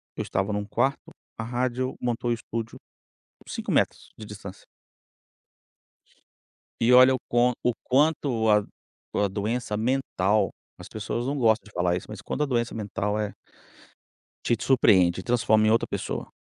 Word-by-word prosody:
Eu - - -3
estava 95 +2 -1
em 105 - -1
um 105 - -3
quarto, 130 +7 -1 0.3
a 115 - -4
rádio 125 +2 -2
montou 120 0 -1
o - - +3
estúdio, 115 -1 -5 0.7
5 - - -4
metros - - 0
de 110 - -9
distância. 105 -2 -10 2.2
E 120 +2 +4
olha 130 +1 +8
o 130 - -5
quan 120 +1 +3
o 125 - +2
quanto 135 -5 +2
a 105 -1 +4 0.5
a 100 - +2
doença 105 +2 -2
mental, 110 -5 +1 0.3
as - - -12
pessoas 110 +4 -3
não 145 +1 -1
gostam 115 -3 +2
de 105 - -15
falar 90 -2 0
isso, 90 - -6
mas 105 -2 -7
quando 150 - -4
a 150 - +2
doença 120 -3 -1
mental 105 0 -2
é 105 -1 -2 1.1
te 120 - +2
surpreende 95 -9 +4
e - - -15
transforma 110 -3 +3
em - - +4
outra 115 - +2
pessoa. - - -4
115 Hz, 160 wpm, -26 LUFS, 105-125 Hz, 2.2 s, olha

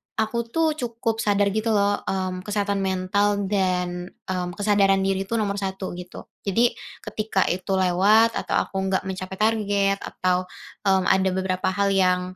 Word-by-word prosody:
aku 230 +1 -1
tuh 320 +5 +1
cukup 230 -2 -2
sadar 205 -2 +2
gitu 220 +1 0
loh, 205 0 +2
mmm, 185 -1 -2
kesehatan 200 0 -1
mental 195 +2 +1
dan, 180 -2 0 0.2
mmm, 180 -1 -3
kesadaran 200 -2 +3
diri 195 0 -1
itu 230 - -2
nomor 205 -2 -1
1 190 -1 -4
gitu. 180 0 -9 0.2
Jadi, 235 +5 +3 0.3
ketika 215 -3 -1
itu 185 +2 -2
lewat 195 +5 +4
atau - - -2
aku 195 - -5
enggak 190 0 0
mencapai 190 0 -5
target, 205 -2 +1
atau, 185 0 -1 0.4
mmm, 190 -1 +4
ada 190 0 +2
beberapa 185 -1 -1
hal 200 +1 +1
yang 185 -1 +3
195 Hz, 155 wpm, -24 LUFS, 185-210 Hz, 0.4 s, lewat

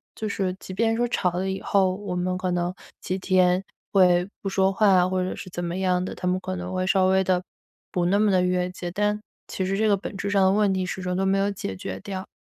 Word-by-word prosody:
就 215 - -4
是 190 -2 -1
即 185 - -8
便 225 +3 +1
说 240 +1 +1
吵 180 -6 0
了 185 +2 -2
以 190 - -3
后， 190 -2 +2
我 200 -2 -5
们 180 +1 -1
可 185 -1 -2
能 175 0 -1 0.3
几 185 - -2
天 185 0 +2 0.3
会 180 -1 +5
不 195 - -2
说 190 0 +2
话， 190 -3 +4
或 185 -1 0
者 185 - -2
是 185 - -8
怎 175 0 -5
么 175 +1 -3
样 180 -1 +1
的， - - -4
他 180 - -4
们 180 +1 +2
可 185 0 -4
能 180 +1 -5
会 185 0 0
稍 190 0 +3
微 190 0 +3
地 180 -1 +1 0.5
不 175 -1 0
那 200 +3 +3
么 215 -1 +3
地 185 -1 +3
越 180 0 +1
界， 175 -1 -6
但 210 +1 0 0.3
其 190 - -3
实 195 +1 -1
这 220 0 +2
个 205 - +4
本 195 +1 -7
质 200 - -3
上 200 -1 +3
的 190 - +5
问 205 -1 +3
题 185 -1 -1
始 190 +1 -4
终 180 0 -2
都 195 - 0
没 195 +1 +2
有 200 +1 +1
解 185 - -4
决 95 0 -5
掉。 190 -1 -6
185 Hz, 285 characters per minute, -25 LUFS, 180-195 Hz, 0.5 s, 会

